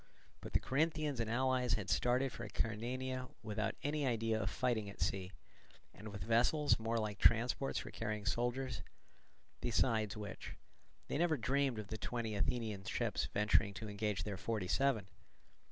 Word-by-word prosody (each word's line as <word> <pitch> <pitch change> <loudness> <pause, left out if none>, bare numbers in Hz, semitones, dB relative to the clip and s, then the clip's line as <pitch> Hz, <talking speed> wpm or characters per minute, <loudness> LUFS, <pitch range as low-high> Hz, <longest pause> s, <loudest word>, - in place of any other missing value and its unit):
But - - -9
the - - +5
Corinthians 150 -1 0
and 115 -1 0
allies 125 0 +2
had 105 -4 0
started 125 +6 +2
for 120 - -7
Acarnania 125 +4 -2
without 110 0 -1
any 145 -1 0
idea 115 -2 +1
of 95 - 0
fighting 115 -5 0
at 100 - -11
sea, 95 +2 -1 0.6
and 105 - -9
with 100 -3 -6
vessels 120 - +3
more 115 +1 0
like 105 -3 -2
transports 120 +5 +3
for - - -4
carrying 105 -2 -3
soldiers; 120 +1 0 0.8
besides 110 -4 +1
which, 105 -3 -6 0.5
they - - -1
never 165 -3 +3
dreamed 130 +1 +1
of 105 -2 -6
the 110 - -4
twenty 115 -3 -2
Athenian 105 -1 -1
ships - - 0
venturing 105 -1 +3
to 110 +3 -5
engage 105 0 -1
their 100 -2 -3
forty 105 -3 -2
seven. 120 -3 +2
115 Hz, 155 wpm, -37 LUFS, 105-130 Hz, 0.8 s, the